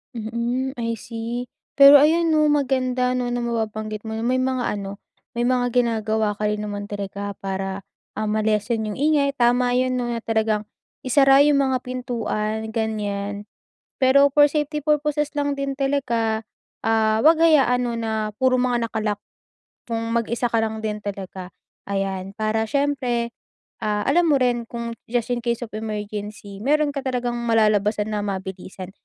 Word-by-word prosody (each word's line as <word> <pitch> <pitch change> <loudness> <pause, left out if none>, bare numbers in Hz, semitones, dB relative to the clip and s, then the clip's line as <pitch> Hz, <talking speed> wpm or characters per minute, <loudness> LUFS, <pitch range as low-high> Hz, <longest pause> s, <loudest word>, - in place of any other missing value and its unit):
Mm, 235 +4 -2
I 230 0 -1
see 230 +3 -6 0.3
pero 280 0 +10
ayon 325 +2 +3
'no, 305 -1 +4
maganda 255 -3 +1
'no, 250 -1 -1
na 245 - -1
mababanggit 215 -2 -3
mo 220 - -4
na 225 - -3
may 255 +1 +2
mga 255 -1 0
ano, 200 0 -6 0.4
may 240 - +1
mga 245 0 +2
ginagawa 220 -3 +1
ka 210 +1 -1
rin 210 0 -2
naman 205 0 -5
talaga 200 0 -5
para, 195 0 -4 0.3
ah, 215 - -1
ma-lessen 215 +1 0
yung 210 - -5
ingay. 290 0 +3
Tama 245 +1 +3
'yon 255 0 +1
'no, 240 -1 -2
na 235 - -2
talagang 220 -1 0 0.4
isara 270 +2 +6
yung 290 -1 +4
mga 265 -1 +1
pintuan 220 -3 -3
ganyan. 205 -2 -3 0.6
Pero, 280 +2 +5
for 290 0 +7
safety 300 0 -1
purposes 300 0 0
lang 285 -1 0
din 275 0 -2
talaga, 235 -6 -1 0.3
ah, 220 -1 +2
wag 325 0 +5
hayaan 265 -6 +4
'no, 235 -1 -2
na 220 -1 -2
puro 260 -1 +3
mga 245 -2 +1
naka-lock 215 -2 -2 0.7
kung 230 -1 -3
mag-isa 235 +1 0
ka 230 - +2
lang 220 0 -2
din 210 -1 -2
talaga. 190 -3 -7 0.3
Ayan, 195 0 -3
para 220 0 0
siyempre, 255 -4 0 0.5
ah, 210 -1 -1
alam 335 +3 +3
mo 280 - +4
rin 245 -2 +1
kung 235 -1 -5 0.2
just 240 -2 0
in 240 - -1
case 235 -1 0
of 230 - -8
emergency 210 -1 -6
mayro'n 295 +5 +2
ka - - -1
talagang 245 -2 -2
malalabasan 210 -2 +2
na 205 - -1
mabilisan. 190 -1 -6
230 Hz, 160 wpm, -23 LUFS, 215-255 Hz, 0.7 s, pero